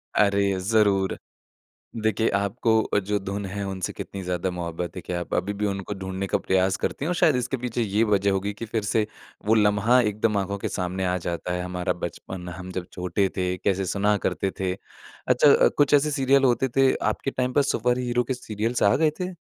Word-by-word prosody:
अरे! 100 -2 +3
ज़रूर। 100 -1 +2 0.9
देखिए 110 +1 +2
आपको 110 +1 +1
जो 105 +1 0
धुन 100 +1 -4
है, 100 +2 -4
उनसे 95 -2 -4
कितनी 100 - -7
ज़्यादा 90 0 -1
मोहब्बत 85 0 -5
है 90 - -5
कि 90 - -6
आप 85 -1 -4
अभी 100 +2 -1
भी 105 +1 -2
उनको 100 0 -3
ढूँढने 95 0 -4
का - - +1
प्रयास 95 0 +1
करती 140 - -3
है - - -1
और 180 - 0
शायद 155 -5 +4
इसके 125 +2 -1
पीछे 120 -1 -3
ये 105 +1 +1
वज़ह 100 -2 +2
होगी 100 +1 -1
कि 115 +3 -7
फिर 110 0 -2
से 110 +1 +1 0.4
वो 110 - +4
लम्हा 105 +3 +4
एकदम 105 -1 0
आँखों 100 +1 -1
के - - -3
सामने 95 0 -2
आ 90 0 +1
जाता 85 0 -3
है, 90 - -2
हमारा 90 0 -2
बचपन 90 +1 -7
हम 95 0 -7
जब 90 -1 -4
छोटे 90 +2 0
थे, 90 0 0
कैसे 95 +1 0
सुना 100 +3 +1
करते 95 +2 0
थे। 95 -1 0 0.5
अच्छा - - +6
कुछ 145 0 +3
ऐसे 145 +1 +4
सीरियल 135 -1 +3
होते 125 +1 +3
थे, 135 +1 +3
आपके 135 - -1
टाइम 125 0 -1
पे 145 - +4
सुपर 125 -2 +1
हीरो 125 -1 0
के 130 - -2
सीरियल्स 115 -1 -2
आ 100 - +5
गए 155 0 +3
थे? 180 0 -2
100 Hz, 205 wpm, -25 LUFS, 95-115 Hz, 0.9 s, अच्छा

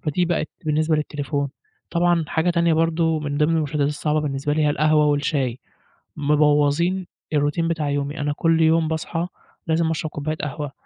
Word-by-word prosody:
فدي 165 +3 0
بقت 170 -2 -1 0.2
بالنسبة 155 +1 +1
للتليفون. 145 -1 -2 0.4
طبعًا 175 -1 +2
حاجة 160 +3 +1
تانية 170 -1 +2
برضو 165 0 +1
من 145 -1 -3
ضمن 155 +2 +3
المشتتات 150 -2 0
الصعبة 150 +1 0
بالنسبة 145 0 -2
لي 155 +1 +1
هي 150 - +3
القهوة 155 0 +3
والشاي 145 -4 0 0.6
مبوظين 150 +5 +2 0.3
الروتين 150 +3 +1
بتاع 160 -3 -1
يومي 145 +2 -2
أنا 145 0 -1
كل 165 +1 +2
يوم 160 0 +3
باصحى 165 +2 -2 0.4
لازم 160 0 +1
أشرب 155 0 -2
كوباية 155 +1 -3
قهوة 150 -1 -4
155 Hz, 160 wpm, -22 LUFS, 145-165 Hz, 0.6 s, ضمن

